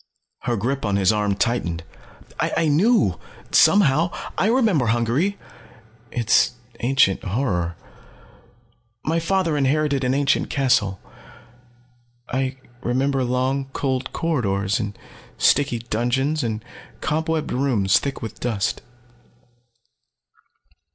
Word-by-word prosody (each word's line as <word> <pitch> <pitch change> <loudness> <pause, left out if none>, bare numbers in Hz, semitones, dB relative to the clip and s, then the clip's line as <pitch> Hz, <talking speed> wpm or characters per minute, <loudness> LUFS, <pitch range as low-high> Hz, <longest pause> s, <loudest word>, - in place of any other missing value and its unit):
Her 120 -1 0
grip 130 +7 -2
on 105 -2 0
his 100 +1 +3
arm 105 -2 0
tightened. 85 -8 -1 0.6
"I 165 - +1
knew 155 - +3 0.3
somehow. 165 -4 +5 0.3
I - - +1
remember 220 - +2
Hungary 120 - +1 0.7
its 120 -1 +3 0.3
ancient 120 -6 +2
horror. 90 -6 -1 1.3
My 165 +2 +1
father 170 -1 0
inherited 140 0 +1
an 130 +1 +1
ancient 140 0 +1
castle. 105 -9 +1 1.3
I 130 +1 -1 0.3
remember 135 +2 0
long 130 +2 0
cold 130 -1 -2
corridors 105 - 0
and 105 -3 -4 0.4
sticky 135 -4 +3
dungeons, 120 +6 -1
and 110 -1 -3 0.4
cobwebbed 160 0 -1
rooms 120 -8 +2
thick 140 -4 -5
with 110 -2 -7
dust. 110 -5 -1
130 Hz, 100 wpm, -22 LUFS, 110-145 Hz, 1.3 s, somehow